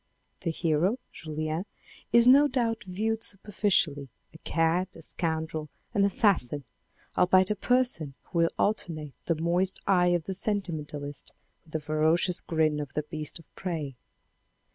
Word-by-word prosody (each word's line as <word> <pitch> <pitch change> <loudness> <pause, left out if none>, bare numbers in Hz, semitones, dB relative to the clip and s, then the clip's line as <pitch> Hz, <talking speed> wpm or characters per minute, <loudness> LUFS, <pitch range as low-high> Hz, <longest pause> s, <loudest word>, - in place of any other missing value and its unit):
The 175 - -2
hero, 165 +6 +1
Julien, 155 +2 -4 0.5
is 235 +1 +6
no 280 +3 +8
doubt, 235 -5 -1
viewed 215 +4 -1
superficially, 190 - 0 0.2
a 160 - -13
cad, 165 +3 +1
a - - -11
scoundrel, 160 -2 -1 0.2
an 200 - +3
assassin, 180 - +2 0.5
albeit 185 +2 +4
a - - +1
person 225 - +1
who 170 - -3
will 165 0 +4
alternate 160 -8 -1
the 165 - +1
moist 175 +4 +1
eye 180 -2 +4
of 175 -2 +2
the 190 - -4
senti 200 -1 0
mentalist 145 -2 -5 0.3
with 155 - -20
the 160 - 0
ferocious 155 +4 +2
grin 155 -2 +1
of 145 -2 -5
the 150 - -1
beast 155 -1 -4
of 165 - -15
prey. 160 -8 -4
170 Hz, 145 wpm, -28 LUFS, 155-195 Hz, 0.5 s, no